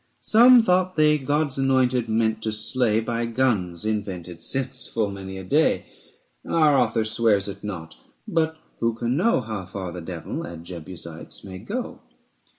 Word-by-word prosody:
Some 240 Hz, +2 st, +7 dB
thought 185 Hz, -2 st, +2 dB
they 150 Hz, -1 st, +4 dB
God's 145 Hz, 0 st, 0 dB
anointed 130 Hz, -3 st, +2 dB
meant 110 Hz, 0 st, +1 dB
to 110 Hz, -, -2 dB
slay 110 Hz, +1 st, +1 dB
130 -, -, -9 dB, 0.2 s
By -, -, -7 dB
guns, 105 Hz, -9 st, 0 dB
invented 95 Hz, -5 st, -3 dB
since 130 Hz, +4 st, -3 dB
full 110 Hz, -3 st, -1 dB
many 95 Hz, -1 st, -7 dB
a 95 Hz, -, -7 dB
day: 90 Hz, -, +2 dB, 0.6 s
Our 155 Hz, -3 st, +3 dB
author 115 Hz, -4 st, +2 dB
swears 110 Hz, -3 st, +2 dB
it 100 Hz, 0 st, -8 dB
not; 85 Hz, -6 st, -6 dB, 0.3 s
but 160 Hz, -1 st, 0 dB, 0.2 s
who 115 Hz, -1 st, +1 dB
can 120 Hz, +2 st, -1 dB
know 180 Hz, -, +3 dB
How 110 Hz, -5 st, -5 dB
far 95 Hz, -2 st, -5 dB
the 90 Hz, -, -7 dB
Devil 85 Hz, 0 st, -5 dB
and 85 Hz, -1 st, -8 dB
Jebusites 85 Hz, -2 st, -8 dB
may 95 Hz, -1 st, -8 dB
go? 235 Hz, -, -5 dB
110 Hz, 160 wpm, -24 LUFS, 95-135 Hz, 0.6 s, Some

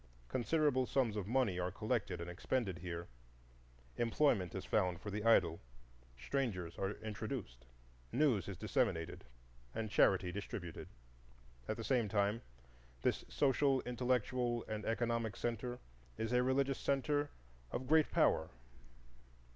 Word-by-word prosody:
Considerable 130 Hz, -1 st, +2 dB
sums 125 Hz, -6 st, +1 dB
of 100 Hz, -3 st, -3 dB
money 115 Hz, -6 st, +2 dB
are 90 Hz, 0 st, 0 dB
collected 105 Hz, -2 st, -1 dB
and 85 Hz, -, -5 dB
expended 95 Hz, +1 st, -1 dB
here, 85 Hz, -1 st, -5 dB, 0.9 s
employment 115 Hz, -, +2 dB
is 95 Hz, -1 st, -4 dB
found 90 Hz, -5 st, +1 dB
for 105 Hz, -, -6 dB
the 105 Hz, +1 st, -3 dB
idle, 90 Hz, -8 st, +4 dB, 0.6 s
strangers 90 Hz, -, -2 dB
are 100 Hz, +1 st, 0 dB
introduced, 105 Hz, -, -5 dB, 0.4 s
news 130 Hz, -7 st, +2 dB
is 100 Hz, -3 st, -5 dB
disseminated 105 Hz, -, 0 dB, 0.5 s
and 110 Hz, -2 st, -3 dB
charity 95 Hz, -3 st, +4 dB
distributed. 90 Hz, -3 st, -6 dB, 0.8 s
At -, -, -2 dB
the -, -, -4 dB
same 120 Hz, -6 st, +2 dB
time 105 Hz, +2 st, +1 dB, 0.6 s
this -, -, +1 dB
social, 135 Hz, -1 st, +3 dB
intellectual, 125 Hz, -1 st, 0 dB
and 105 Hz, -1 st, -4 dB
economic 115 Hz, -2 st, 0 dB
centre 120 Hz, +1 st, -2 dB, 0.4 s
is 110 Hz, +2 st, -2 dB
a 125 Hz, -, +5 dB
religious 135 Hz, +1 st, +1 dB
centre 145 Hz, +1 st, +1 dB, 0.4 s
of 130 Hz, -, -3 dB
great 155 Hz, +3 st, +4 dB
power. -, -, +3 dB
115 Hz, 125 wpm, -37 LUFS, 95-130 Hz, 0.9 s, a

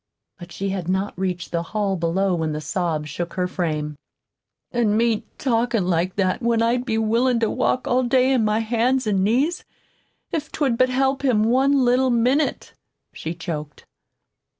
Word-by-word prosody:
But 175 Hz, 0 st, -11 dB
she 195 Hz, +2 st, -3 dB
had 185 Hz, -3 st, -3 dB
not 190 Hz, +2 st, -1 dB
reached 180 Hz, -1 st, -3 dB
the 170 Hz, -, 0 dB
hall 200 Hz, +2 st, -1 dB
below 180 Hz, +3 st, 0 dB
when 160 Hz, -3 st, -1 dB
the 150 Hz, -, -3 dB
sobs 155 Hz, -1 st, -2 dB
shook 170 Hz, +4 st, -5 dB
her 180 Hz, -1 st, 0 dB
frame. 155 Hz, -5 st, -3 dB, 0.7 s
"An' 220 Hz, -3 st, +1 dB
me 230 Hz, -2 st, +1 dB
talkin' 230 Hz, -6 st, 0 dB
like 175 Hz, +1 st, 0 dB
that 185 Hz, +2 st, 0 dB
when 235 Hz, -1 st, +1 dB
I'd 240 Hz, +2 st, +1 dB
be 225 Hz, -3 st, -1 dB
willin' 230 Hz, +3 st, +2 dB
to 225 Hz, -, +1 dB
walk 255 Hz, 0 st, 0 dB
all 250 Hz, +1 st, +2 dB
day 255 Hz, +1 st, +3 dB
on 245 Hz, -4 st, +2 dB
my 215 Hz, +1 st, +1 dB
hands 240 Hz, +3 st, +1 dB
an' 195 Hz, -3 st, +1 dB
knees, 270 Hz, -, +1 dB, 0.7 s
if't 310 Hz, -2 st, -4 dB
would 260 Hz, -6 st, +1 dB
help 265 Hz, +2 st, 0 dB
him 235 Hz, -6 st, +3 dB
one 265 Hz, +3 st, +3 dB
little 255 Hz, +2 st, +3 dB
minute," 255 Hz, +5 st, +1 dB, 0.4 s
she 165 Hz, +2 st, -5 dB
choked. 155 Hz, -4 st, -6 dB
220 Hz, 170 wpm, -22 LUFS, 180-250 Hz, 0.7 s, day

